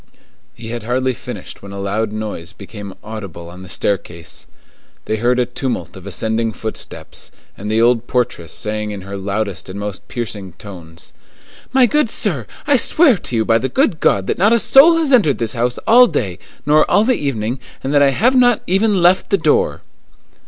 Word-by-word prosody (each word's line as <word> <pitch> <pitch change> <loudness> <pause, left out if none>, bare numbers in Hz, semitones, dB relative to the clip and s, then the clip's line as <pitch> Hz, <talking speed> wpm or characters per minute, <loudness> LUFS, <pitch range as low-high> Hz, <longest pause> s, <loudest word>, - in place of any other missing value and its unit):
He 115 -1 -9
had 120 0 -4
hardly 130 +3 -1
finished - - -9
when 100 - -10
a 100 - -7
loud 105 +2 -2
noise 105 -5 -6
became 100 -1 -10
audible 100 -6 -8
on 90 +1 -11
the 95 - -11
staircase. 85 -4 -4 0.6
They 110 - -1
heard 120 +3 +1
a 125 - +2
tumult 120 -7 -4
of 95 0 -11
ascending 110 +3 -1
footsteps, 110 0 -5 0.3
and 105 +2 -6
the 110 +1 +2
old 120 0 +2
portress 120 -10 -2
saying 105 0 -3
in 100 -2 -6
her 100 +1 -8
loudest 100 0 -3
and 95 +2 -6
most 100 -2 -6
piercing 105 -6 -5
tones:— 85 -4 -11 0.6
"My 260 -1 +5
good 300 +1 +1
sir, 155 - 0 0.2
I 285 -1 +4
swear 295 +1 +5
to 125 - -5
you 110 -1 +1
by 115 -1 +3
the 130 - -2
good 235 - +1
God, 95 -1 +2
that - - -2
not 210 +5 +4
a - - +5
soul 270 +9 +6
has 310 -4 +1
entered 180 - +4
this 115 -2 -1
house 120 0 -1
all 245 +2 +7
day, 95 - -3 0.3
nor 150 +1 +4
all 205 +4 +4
the 255 +3 +3
evening, 125 - -2 0.2
and 135 - -2
that 145 - +4
I 140 - +5
have 235 - +2
not 245 -2 +4
even 195 0 +2
left 180 +2 +4
the 200 - +3
door." 460 - +1
115 Hz, 195 wpm, -18 LUFS, -, 0.6 s, all